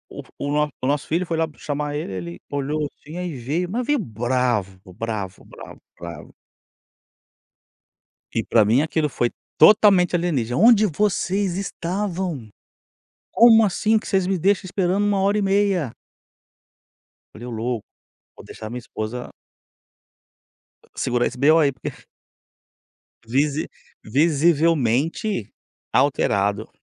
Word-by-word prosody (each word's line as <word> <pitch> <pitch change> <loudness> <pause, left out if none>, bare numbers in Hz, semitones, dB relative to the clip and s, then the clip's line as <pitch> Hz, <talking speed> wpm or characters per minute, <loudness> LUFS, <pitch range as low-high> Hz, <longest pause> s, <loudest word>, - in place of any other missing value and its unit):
o - - -6
f - - -23
o - - -3 0.2
o - - -10
o - - +1
nosso 140 -2 0
filho 170 +3 0
foi 170 - -2
lá 160 0 +1
chamar 145 0 -3
ele, 90 - -6
olhou 145 +2 -2 0.2
assim, 155 +4 -10
aí 180 -5 -4
veio, 150 +9 -2
mas 240 +5 -2
veio 295 +2 +2
bravo, 120 - -1
bravo, 105 -2 -5
bravo, - - -13 0.2
bravo. 85 -3 -9 2.0
E 115 - -1
para 110 0 +3
mim 115 +7 +3
aquilo 155 -1 0
foi 120 -2 -1 0.3
totalmente 200 -4 +6
alienígena. 140 -9 -1
"A - - +1
onde 225 -2 +6
vocês 195 0 0
estavam? 185 - -3 0.8
Como 225 -1 +7
assim 215 +3 +1
que - - -11
vocês 190 -2 +1
me 190 0 0
deixam 195 +3 +2
esperando 190 +2 0
1h30?" 195 - +1 1.4
Falei: 120 +3 -9
"Ô - - -5
louco, 115 0 -3 0.5
vou - - -13
deixar 110 - -9
a - - -7
minha 125 +1 -5
esposa" 115 +2 -6 1.7
"segurar 120 -1 0
esse 125 - -7
B.O 155 +5 +5
aí". 145 -3 +3
Porque 130 - -9
f - - -16 1.2
Visi 140 +5 0 0.3
visivelmente 155 - +1 0.4
alterado 100 +2 +1
150 Hz, 130 wpm, -22 LUFS, 120-190 Hz, 2.0 s, Como